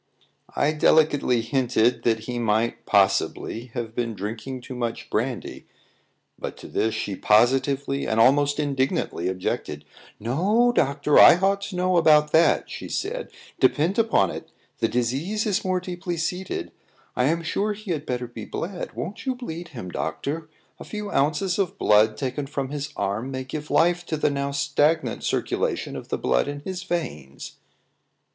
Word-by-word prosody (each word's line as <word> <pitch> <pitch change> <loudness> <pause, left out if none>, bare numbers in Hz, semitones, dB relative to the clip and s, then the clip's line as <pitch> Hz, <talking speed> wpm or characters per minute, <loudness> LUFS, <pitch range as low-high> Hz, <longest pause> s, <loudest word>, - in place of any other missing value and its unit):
I 145 - +2
delicately 150 -5 +3
hinted 120 -1 +1
that 115 -2 +2
he 120 +2 -4
might, 115 0 0
possibly, 100 +3 +1
have 115 -2 -4
been 115 -2 -2
drinking 110 +6 -5
too 130 - -8
much 120 -2 -4
brandy; 120 +2 -3 0.7
but - - -5
to - - -10
this 110 0 0
she 100 - -3
positively 135 +6 +2
and 110 0 0
almost 145 +4 +4
indignantly 135 - -1
objected. 95 0 -3 0.3
"No, 195 - +2
doctor; 145 - +3
I - - +9
ought 195 +2 +1
to 195 - -7
know 180 0 +2
about 150 -2 +5
that," 160 -1 +4
she - - -7
said. - - -3 0.3
"Depend 160 - +2
upon 215 - +3
it, - - -8 0.3
the - - +2
disease 135 - -1
is 205 -2 0
more 185 -1 0
deeply 180 -1 -5
seated. 180 +3 -3 0.4
I 125 - +2
am 165 +4 +1
sure 205 +6 -1
he 205 -2 -7
had 155 -3 -3
better 125 -1 -2
be 115 -2 -8
bled. 180 +1 -5
Won't 210 - -6
you 260 - +1
bleed 175 -9 -6
him, 115 - -8
doctor? 145 - -4 0.3
A - - -7
few 210 -1 -6
ounces 155 +7 +1
of 190 -3 -1
blood 110 +1 +4
taken 135 +1 -3
from 135 -2 -3
his 145 0 -4
arm 100 +6 -2
may 130 -1 -4
give 150 +3 -6
life 175 +1 +3
to 155 - -2
the 150 - +1
now 140 0 -2
stagnant 145 +3 +1
circulation - - -1
of - - -7
the - - -2
blood 60 -1 +1
in 145 0 -5
his 185 +3 -5
veins." 155 - -5
140 Hz, 165 wpm, -24 LUFS, 120-170 Hz, 0.7 s, I